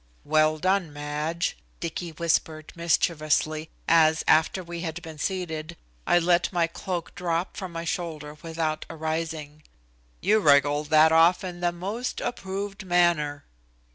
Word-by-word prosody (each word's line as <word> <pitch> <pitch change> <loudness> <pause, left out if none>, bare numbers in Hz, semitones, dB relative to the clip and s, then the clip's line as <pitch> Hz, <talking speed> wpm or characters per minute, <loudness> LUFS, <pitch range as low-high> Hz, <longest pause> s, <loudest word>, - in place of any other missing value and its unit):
"Well 155 +1 +3
done, 185 0 +1
Madge," 150 +4 -2 0.2
Dicky 170 +1 -4
whispered 160 -1 -1
mischievously, 155 -2 +1 0.2
as, 160 -1 +4
after 160 +4 +3
we 170 0 -6
had 165 -1 -4
been 160 -2 -9
seated, 170 -2 -3 0.3
I - - +5
let 175 0 +2
my 175 -3 +2
cloak 170 +1 -5
drop 175 -1 -2
from 185 -2 -6
my 165 0 -5
shoulders 155 -3 -4
without 160 -2 -2
arising. 160 -2 -4 0.6
"You 210 +4 +3
wriggled 145 -2 +3
that 155 0 +6
off 165 +3 +5
in 180 -1 -6
the 175 0 +1
most 200 +8 -4
approved 195 -2 -4
manner." 175 -5 +1
165 Hz, 135 wpm, -26 LUFS, 155-175 Hz, 0.6 s, that